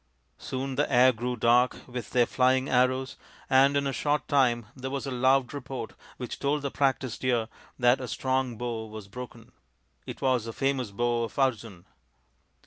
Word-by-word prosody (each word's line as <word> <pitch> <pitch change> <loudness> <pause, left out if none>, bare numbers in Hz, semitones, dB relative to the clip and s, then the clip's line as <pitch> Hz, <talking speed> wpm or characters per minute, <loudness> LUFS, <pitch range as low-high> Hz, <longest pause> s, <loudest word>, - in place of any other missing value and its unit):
Soon 130 0 -4
the - - +1
air 125 +1 +6
grew 125 +2 -3
dark 120 +2 +2
with 125 -3 -6
their 125 -1 +3
flying 130 +2 +2
arrows, 130 0 +1 0.3
and 135 +2 +5
in 140 - 0
a 135 - -1
short 145 +3 -1
time 120 -5 +2
there 130 0 -5
was 140 +1 -4
a 135 - -4
loud 130 +2 +2
report 130 -4 -6 0.2
which 125 -2 -6
told 145 +1 0
the 140 - -2
practised 135 -3 -1
ear 120 -3 +1 0.3
that 125 +1 +3
a 125 - -5
strong 130 0 -1
bow 115 -2 -4
was 110 -2 -9
broken. 120 +1 -10 0.6
It - - -7
was 130 -4 +1
the 115 - -6
famous 135 -3 -1
bow 120 +3 0
of - - -12
Arjun 115 -9 -1
125 Hz, 175 wpm, -27 LUFS, 120-135 Hz, 0.6 s, air